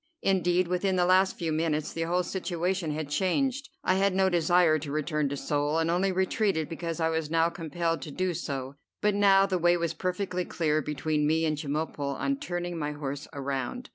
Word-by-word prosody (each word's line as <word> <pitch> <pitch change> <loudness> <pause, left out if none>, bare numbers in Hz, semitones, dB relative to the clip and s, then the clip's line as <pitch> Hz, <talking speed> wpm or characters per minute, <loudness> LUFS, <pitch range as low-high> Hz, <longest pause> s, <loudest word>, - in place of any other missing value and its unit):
Indeed 180 -2 +2
within 180 +2 0
the 180 -1 +3
last 185 +1 +3
few 165 -3 -2
minutes 155 -1 -1
the 165 - -4
whole 180 +1 +2
situation 180 -1 -2
had 150 0 -3
changed. 255 - 0
I - - +3
had 195 -1 +2
no 190 0 +3
desire 175 -2 +3
to 145 -1 -6
return 150 -1 0
to 140 - -3
Seoul, 145 +2 0
and 165 0 +1
only 190 +3 +2
retreated 190 -3 0
because 165 0 -4
I 160 0 +2
was 160 -2 -1 0.2
compelled 165 0 -2
to - - -6
do 185 +4 -1
so; 140 -4 -5 0.2
but 210 0 +2
now 195 -1 +5
the 190 -2 -1
way 175 +1 +4
was 170 -1 -1
perfectly 180 0 -2
clear 155 -3 0
between 150 +1 -1
me 160 +1 +2
and 155 -1 +1
Chemulpo 145 -1 -3
on 275 - -1
turning 175 - -4
my 150 -1 -2
horse 145 0 -5
around. 140 - -4
170 Hz, 195 wpm, -28 LUFS, 150-185 Hz, 0.2 s, now